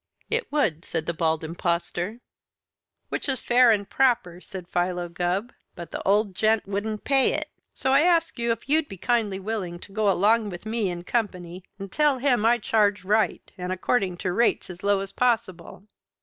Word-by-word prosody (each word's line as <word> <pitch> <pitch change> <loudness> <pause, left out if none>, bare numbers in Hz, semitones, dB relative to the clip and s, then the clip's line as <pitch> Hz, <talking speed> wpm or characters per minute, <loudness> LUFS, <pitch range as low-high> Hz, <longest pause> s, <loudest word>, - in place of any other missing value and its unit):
"It 460 -5 -1
would," 200 - +1
said 165 -3 -3
the 170 - -1
Bald 160 -1 0
Impostor. 175 +6 -2 0.9
"Which - - -3
is 265 - 0
fair 245 0 +5
and 205 -3 +2
proper," 225 -10 +1
said 185 -3 -9
Philo 175 0 -1
Gubb, 180 +7 -2 0.2
"but 170 - -9
the - - -4
old 205 0 +2
gent 215 +2 +1
wouldn't 205 +2 -3
pay 270 -2 +3
it. - - -3 0.2
So 265 - 0
I 275 - +6
ask 335 -5 +2
you 235 0 +1
if 230 +2 -4
you'd 305 +1 +2
be 195 - -8
kindly 210 -2 0
willing 195 -4 -4
to - - -12
go 215 +1 -1
to - - +5
him - - +4
along 215 +2 +3
with 175 +1 -8
me 220 -3 -1
in 175 -1 -5
company 180 -5 -3
and 195 -1 -8
tell 295 -3 +2
him 245 -4 +2
I 240 +1 +4
charged 205 -3 +1
right 215 +2 +1
and 180 0 -3
according 185 0 0
to 180 - +1
rates 230 -3 +1
as 180 0 -12
low 200 -1 +2
as 195 0 -6
possible?" 220 -8 -1
205 Hz, 195 wpm, -25 LUFS, 180-235 Hz, 0.9 s, I